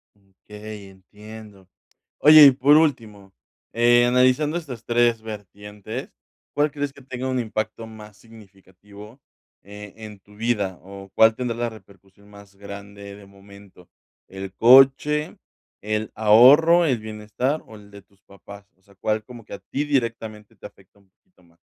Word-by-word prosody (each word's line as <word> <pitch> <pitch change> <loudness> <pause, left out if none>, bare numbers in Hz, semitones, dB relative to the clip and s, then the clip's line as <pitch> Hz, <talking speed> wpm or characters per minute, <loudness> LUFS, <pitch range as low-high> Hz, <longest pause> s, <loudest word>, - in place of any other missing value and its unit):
Mm, 100 -1 -33 0.2
okey, 105 -1 -10
entiendo. 105 +1 -15 0.5
Oye, 150 0 +8
y 140 - +8
por 140 +3 +3
último, 110 -11 -2 0.4
eh, 120 +1 +3
analizando 130 +6 +1
estas 130 -9 -9
3 120 -1 +1
vertientes, 105 +2 -9 0.4
¿cuál 150 0 0
crees 145 -1 -5
que 140 - -17
tenga 130 0 -7
un 130 -1 -2
impacto 110 -1 -5
más 105 -2 -14
significativo, 105 +1 -17 0.4
eh, 105 +1 -12
en 105 -2 -11
tu 105 +2 -22
vida, 105 -5 -3
o 95 +1 -12
cuál 110 0 +4
tendrá 120 -2 -4
la 120 0 -2
repercusión 100 -2 -19
más 100 -1 -17
grande 100 0 -11
de 100 0 -15
momento, 100 -2 -18 0.4
el 95 0 -9
coche, 135 +6 +4 0.4
el 105 +1 -4
ahorro, 140 +11 +5
el 130 -7 0
bienestar 110 +7 -4
o 110 - -14
el 105 -1 -17
de 100 0 -14
tus 100 0 -34
papás? 100 +1 -15
O - - -38
sea, 100 +1 -25
¿cuál 110 +2 -3
como 120 +1 -13
que - - -12
a 100 - -8
ti 140 - -5
directamente 115 -6 -4
te 100 - -16
afecta 95 +1 -26
un 100 -1 -30
poquito 90 0 -33
más? 85 0 -29
110 Hz, 155 wpm, -22 LUFS, 100-120 Hz, 0.5 s, Oye